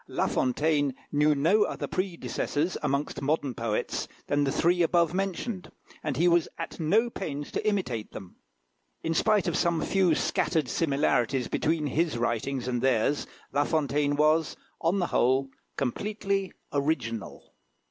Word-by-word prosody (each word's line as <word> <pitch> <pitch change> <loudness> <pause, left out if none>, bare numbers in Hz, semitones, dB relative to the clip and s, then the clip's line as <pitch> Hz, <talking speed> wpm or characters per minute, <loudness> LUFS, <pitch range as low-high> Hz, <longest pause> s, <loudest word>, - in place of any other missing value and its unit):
La - - 0
Fontaine 145 +1 +1 0.2
knew 150 +1 +3
no 165 +10 +3
other - - 0
predecessors, 170 - -2
amongst 140 0 -1
modern 140 -2 0
poets, 115 -2 -2 0.2
than 145 0 +1
the 135 - 0
three 175 +4 +2
above 170 -1 +3
mentioned, 195 +1 -3 0.3
and 145 -5 -2
he 170 +4 +4
was 170 -1 +4
at - - -6
no 200 +9 +3
pains 145 -10 -5
to - - -2
imitate 155 - -1
them. 95 - -10 0.7
In 165 - 0
spite 210 +4 +2
of - - 0
some 170 -2 +2
few 185 -5 +3
scattered 160 -3 0
similarities 135 -4 +1
between 160 -1 0
his 155 0 0
writings 120 +2 -1
and 125 -1 -1
theirs, 130 +2 +1 0.3
La 145 - +3
Fontaine 145 -2 +1
was, 155 +1 +2 0.2
on 170 +4 +2
the 180 - +1
whole, 130 +2 +3 0.3
completely 195 - -1 0.2
original. 140 -7 -2
150 Hz, 145 wpm, -28 LUFS, 135-175 Hz, 0.7 s, he